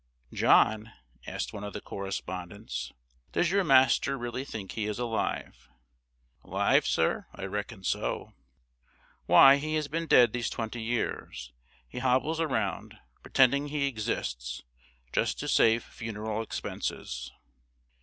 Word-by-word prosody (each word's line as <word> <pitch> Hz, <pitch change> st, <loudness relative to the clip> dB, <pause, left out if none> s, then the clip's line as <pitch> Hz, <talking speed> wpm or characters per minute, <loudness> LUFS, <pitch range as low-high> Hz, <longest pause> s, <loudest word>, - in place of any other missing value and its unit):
"John," 110 Hz, +1 st, +3 dB, 0.3 s
asked -, -, -4 dB
one 105 Hz, -, -6 dB
of 105 Hz, -, -6 dB
the -, -, -4 dB
correspondents, 90 Hz, -, -5 dB, 0.4 s
"does 175 Hz, -, +2 dB
your 200 Hz, 0 st, +3 dB
master 135 Hz, -2 st, +4 dB
really 120 Hz, +1 st, -4 dB
think 105 Hz, -8 st, -7 dB
he 105 Hz, -2 st, -3 dB
is 105 Hz, -, -3 dB
alive?" 110 Hz, -, -3 dB, 0.7 s
"'Live, -, -, +2 dB
sir? -, -, +1 dB
I -, -, -8 dB
reckon 105 Hz, +1 st, -5 dB
so." -, -, -2 dB, 0.9 s
"Why, 135 Hz, +1 st, +8 dB
he 155 Hz, +2 st, -2 dB
has 155 Hz, -1 st, -1 dB
been 165 Hz, +2 st, -3 dB
dead 120 Hz, -6 st, +6 dB
these 120 Hz, -1 st, -1 dB
twenty 115 Hz, +1 st, -4 dB
years. 110 Hz, -, -3 dB, 0.3 s
He 125 Hz, -, -7 dB
hobbles 130 Hz, +6 st, +1 dB
around, 120 Hz, -12 st, -2 dB, 0.2 s
pretending 140 Hz, +2 st, +3 dB
he 145 Hz, -1 st, -1 dB
exists, 65 Hz, -, -3 dB, 0.5 s
just -, -, +1 dB
to -, -, -4 dB
save 115 Hz, 0 st, +4 dB
funeral 110 Hz, -1 st, -5 dB
expenses." 65 Hz, -, -5 dB
115 Hz, 125 wpm, -29 LUFS, 100-135 Hz, 0.9 s, Why